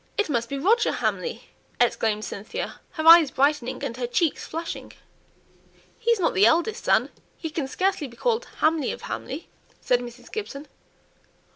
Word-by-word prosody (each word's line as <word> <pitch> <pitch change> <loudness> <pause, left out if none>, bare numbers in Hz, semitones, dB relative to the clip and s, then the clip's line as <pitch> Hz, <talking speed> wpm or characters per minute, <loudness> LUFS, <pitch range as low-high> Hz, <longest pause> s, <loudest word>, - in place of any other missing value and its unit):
"It 420 - +1
must 235 -3 -1
be 275 - -3
Roger 435 - +3
Hamley!" 485 0 -2 0.4
exclaimed 220 -3 +1
Cynthia, 200 +2 -6
her 315 -2 -3
eyes 330 -2 +9
brightening, 275 -1 0
and 255 -4 -3
her 245 -1 -2
cheeks 315 +5 0
flushing. 330 +1 -6 1.1
"He's 465 -1 +2
not 345 - +1
the 200 +4 +5
eldest 385 - +1
son; - - +3 0.3
he 320 - -5
can 300 -4 -2
scarcely 370 0 0
be 240 -2 -15
called 485 0 0 0.2
Hamley 315 -2 +2
of - - -8
Hamley!" - - -5 0.3
said 245 - +2
Mrs. 245 0 -10
Gibson. 305 -9 -6
300 Hz, 155 wpm, -25 LUFS, 245-370 Hz, 1.1 s, eyes